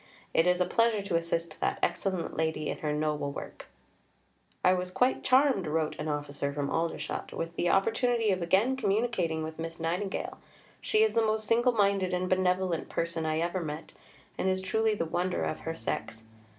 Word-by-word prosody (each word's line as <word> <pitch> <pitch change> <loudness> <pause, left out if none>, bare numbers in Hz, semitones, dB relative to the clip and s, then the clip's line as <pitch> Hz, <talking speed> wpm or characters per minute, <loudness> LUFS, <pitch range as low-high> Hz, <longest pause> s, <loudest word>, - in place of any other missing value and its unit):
It 165 - +4
is 180 0 +3
a 180 - +3
pleasure 230 -2 +2
to 195 -3 -2
assist 165 -1 -1
that - - 0
excellent 185 -4 -1
lady 160 -1 -1
in - - -3
her 150 - -1
noble 150 -1 -1
work": - - -8 1.0
"I 180 - +6
was 180 0 -2
quite 250 +8 +1
charmed," 255 - +4
wrote 155 0 0
an 150 - -3
officer 145 -1 -2
from 140 0 -2
Aldershot, 165 0 -2
"with 165 +1 -4
the 175 - +1
opportunity 225 +3 +2
of 185 -1 0
again 195 +10 +3
communicating 205 -8 0
with 160 +1 -6
Miss 165 +1 -5
Nightingale. 180 +5 -2 0.4
She 430 0 +3
is 440 - +2
the 230 - +3
most 215 0 0
single 240 +3 +3
minded 200 -3 +2
and 180 +1 -1
benevolent 185 -2 +1
person 165 -1 -2
I 155 +1 0
ever 175 +2 -1
met, 155 0 -6 0.5
and 190 - +2
is 190 0 +1
truly 220 +3 +1
the 165 - -1
wonder 175 +3 -1
of 155 - -2
her 165 0 -4
sex. 110 -2 -4
180 Hz, 185 wpm, -29 LUFS, 160-205 Hz, 1.0 s, I